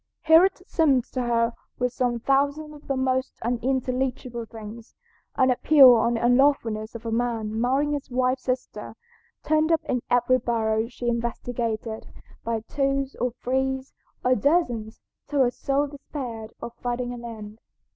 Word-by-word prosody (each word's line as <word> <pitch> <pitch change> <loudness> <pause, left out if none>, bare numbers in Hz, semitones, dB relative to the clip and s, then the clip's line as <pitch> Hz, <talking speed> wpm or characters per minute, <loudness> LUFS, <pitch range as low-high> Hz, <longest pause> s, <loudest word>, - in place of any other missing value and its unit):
Here 320 +2 +7
it 380 -1 -3
seemed 280 -7 +3
to 255 - -1
her 235 -1 +1 0.2
were 250 0 0
some 245 -1 -1
thousands 285 +4 0
of 295 0 -15
the 275 - -1
most 260 0 0
unintelligible 250 0 -2
things. 220 +1 -10 0.4
"An 260 -1 +4
appeal 265 0 +7
on 235 +1 +2
the 230 - -1
unlawfulness 240 -4 +2
of 230 - -8
a 225 - -2
man 225 -2 -1
marrying 270 +4 +1
his 290 -2 -3
wife's 255 +1 0
sister" 255 0 -4 0.5
turned 310 +1 +2
up 325 - +2
in 250 - -1
every 245 +1 +3
barrel 225 -2 0
she 245 -1 -6
investigated, 235 -1 -3 0.4
by 230 -1 -2
twos, 275 +2 -1
or 250 - 0
threes, 265 +1 -2 0.3
or 255 - +5
dozens, 245 - 0 0.3
till 285 -1 +1
her 245 - +2
soul 275 +3 0
despaired 265 -6 -7
of 235 - -6
finding 245 0 -2
an 240 -1 -8
end. 220 -2 -9
250 Hz, 155 wpm, -25 LUFS, 230-270 Hz, 0.5 s, Here